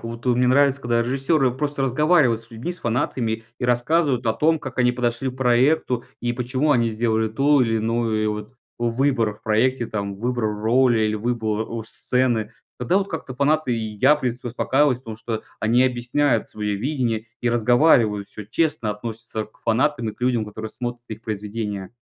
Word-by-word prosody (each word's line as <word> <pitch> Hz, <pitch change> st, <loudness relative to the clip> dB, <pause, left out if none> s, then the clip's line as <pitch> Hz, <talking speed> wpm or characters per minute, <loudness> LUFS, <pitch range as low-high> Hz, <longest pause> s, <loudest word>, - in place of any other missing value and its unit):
Вот, 115 Hz, +1 st, -7 dB
о, 125 Hz, -, +4 dB
мне 125 Hz, 0 st, +3 dB
нравится, 140 Hz, +1 st, +3 dB
когда 120 Hz, -1 st, +1 dB
режиссеры 135 Hz, +3 st, +1 dB
просто 145 Hz, +2 st, -2 dB
разговаривают 135 Hz, -3 st, +3 dB
с 115 Hz, -, -22 dB
людьми, 120 Hz, +10 st, -5 dB
с 180 Hz, -, -11 dB
фанатами 115 Hz, -2 st, -1 dB
и -, -, -3 dB
рассказывают 125 Hz, +1 st, +1 dB
о 110 Hz, -, +3 dB
том, 160 Hz, +6 st, +2 dB
как 135 Hz, -1 st, -8 dB
они 125 Hz, 0 st, +4 dB
подошли 120 Hz, +1 st, -1 dB
к 130 Hz, -, -13 dB
проекту 125 Hz, 0 st, +2 dB, 0.2 s
и 120 Hz, 0 st, -1 dB
почему 130 Hz, +4 st, -1 dB
они 120 Hz, -4 st, +3 dB
сделали 110 Hz, 0 st, 0 dB
ту 140 Hz, +5 st, +3 dB
или 115 Hz, -2 st, +2 dB
иную, 110 Hz, -1 st, 0 dB
э, -, -, +1 dB
вот 105 Hz, +5 st, -5 dB, 0.2 s
выбор 120 Hz, -2 st, +1 dB
в -, -, -23 dB
проекте 120 Hz, +3 st, +1 dB
там, 100 Hz, -2 st, -3 dB
выбор 120 Hz, +3 st, -2 dB
роли 115 Hz, +3 st, +2 dB
или 110 Hz, 0 st, +1 dB
выбор, 110 Hz, -1 st, -1 dB
ож 115 Hz, -1 st, -6 dB
сцены. 120 Hz, -3 st, 0 dB, 0.3 s
Тогда 125 Hz, +10 st, +1 dB
вот 200 Hz, -, -3 dB
как-то 145 Hz, -6 st, -5 dB
фанаты 140 Hz, -1 st, +1 dB
и 110 Hz, -2 st, -4 dB
я, 135 Hz, +8 st, +5 dB
в 150 Hz, -, -7 dB
принципе, 125 Hz, 0 st, -3 dB
успокаиваюсь, 130 Hz, +2 st, +2 dB
потому 115 Hz, -4 st, -8 dB
что 110 Hz, -1 st, -4 dB, 0.2 s
они 115 Hz, +3 st, +3 dB
объясняют 125 Hz, 0 st, +1 dB
свое 105 Hz, -1 st, -3 dB
видение 120 Hz, -2 st, -1 dB
и 120 Hz, -, +1 dB
разговаривают, 120 Hz, -3 st, +3 dB
всё 105 Hz, -, -9 dB
честно 145 Hz, -1 st, 0 dB
относятся 110 Hz, +1 st, -5 dB
к 110 Hz, -, -28 dB
фанатам 120 Hz, +1 st, 0 dB
и -, -, -4 dB
к -, -, -35 dB
людям, 120 Hz, -3 st, +1 dB
которые 110 Hz, +1 st, -6 dB
смотрят 120 Hz, +1 st, -5 dB
их 110 Hz, 0 st, -7 dB
произведения. 105 Hz, -2 st, -4 dB
120 Hz, 190 wpm, -22 LUFS, 110-130 Hz, 0.3 s, я